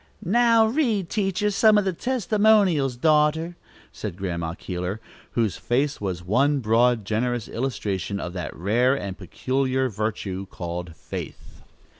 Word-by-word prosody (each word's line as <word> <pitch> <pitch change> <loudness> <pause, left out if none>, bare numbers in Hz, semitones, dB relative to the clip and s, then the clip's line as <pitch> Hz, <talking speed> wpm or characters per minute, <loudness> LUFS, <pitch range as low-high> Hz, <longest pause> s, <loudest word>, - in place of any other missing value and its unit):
"Now, 230 +3 +4
read 220 - 0
teacher 205 0 0
some 215 +1 +5
of 205 - +2
the 190 - 0
testimonials, 205 - +2
daughter," 155 +4 +2 0.4
said 85 - -6
Grandma 85 -4 -3
Keeler, 90 +3 -4 0.3
whose 115 -4 0
face 140 +3 -1
was 90 -3 -3
one 135 +10 +2
broad, 115 -1 +2
generous 120 +2 -1
illustration 100 -6 -3
of 90 - -5
that 90 -2 -5
rare 120 +9 +2
and 100 -7 -5
peculiar 130 - -1
virtue 100 -3 -3
called 85 -2 -6
faith. - - -8
125 Hz, 130 wpm, -24 LUFS, -, 0.4 s, some